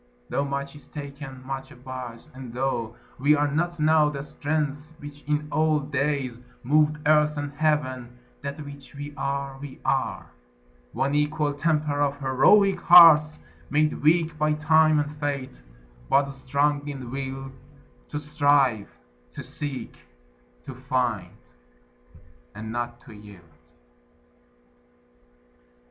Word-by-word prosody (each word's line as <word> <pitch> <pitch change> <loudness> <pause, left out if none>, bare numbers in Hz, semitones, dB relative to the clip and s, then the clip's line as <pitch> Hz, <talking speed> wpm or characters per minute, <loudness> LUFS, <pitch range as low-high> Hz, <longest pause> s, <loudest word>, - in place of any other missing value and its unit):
Tho' 140 - 0
much 140 0 -4
is 145 - -13
taken, 140 -2 -9
much 135 0 -5
abides; 125 -2 -9
and 130 -2 -9
tho' 120 -2 -2 0.2
We 145 +3 +4
are 145 0 +1
not 170 +4 -2
now 155 -1 +4
that 140 -2 -5
strength 150 +1 -3
which 145 -1 -11
in 150 0 0
old 155 -2 +1
days 140 -4 -1 0.2
Moved 150 +3 +3
earth 150 0 +4
and 145 0 -4
heaven, 130 -5 -1 0.2
that 140 +1 -6
which 140 -1 -12
we 145 +1 -7
are, 140 -2 -3
we 140 -2 -9
are; - - -1 0.6
One 140 +1 -1
equal 150 0 0
temper 150 -1 0
of 145 0 0
heroic 145 +9 +4
hearts, 160 -3 +8 0.3
Made 150 +1 +1
weak 160 +1 +3
by 155 0 +2
time 155 +1 +4
and 145 0 -3
fate, 140 - -4 0.5
but 140 0 +3
strong 140 +2 0
in 130 -4 -6
will 135 0 -5 0.6
To 150 - -4
strive, 145 -7 +2 0.4
to - - -7
seek, 145 -3 -6 0.7
to 135 - -7
find, 125 -4 -1 1.3
and 110 +1 -6
not 120 0 -4
to - - -14
yield. 105 -3 -13
145 Hz, 125 wpm, -25 LUFS, 130-150 Hz, 1.3 s, hearts